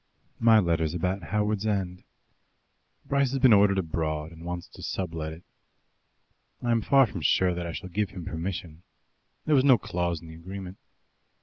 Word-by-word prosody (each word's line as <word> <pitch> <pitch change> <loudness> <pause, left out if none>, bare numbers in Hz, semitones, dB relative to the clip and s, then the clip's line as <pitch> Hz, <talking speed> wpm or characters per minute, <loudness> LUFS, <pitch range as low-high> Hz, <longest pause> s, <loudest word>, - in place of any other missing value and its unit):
My 115 -1 +6
letter's 85 -4 +1
about 90 +3 -1
Howards 105 +1 0
End. 95 -3 -2 1.0
Bryce 140 -1 +1
has 135 - 0
been 125 -3 +6
ordered 100 -1 +5
abroad, 80 -3 -2
and 85 0 -12
wants 90 0 -5
to - - -13
sublet 80 -4 -4
it. 80 +2 -11 1.2
I 120 - +1
am 115 -1 +2
far 135 +4 +5
from 95 -6 -6
sure 90 +4 +3
that 85 0 -4
I - - -4
shall 90 - -7
give 100 +2 -1
him 90 -4 -8
permission. 85 -1 -5 0.6
There 155 - +2
was 135 -3 +5
no 135 -3 +6
clause 85 -3 -2
in 85 - -13
the 80 - -10
agreement. 95 +3 -8
90 Hz, 175 wpm, -27 LUFS, 85-105 Hz, 1.2 s, My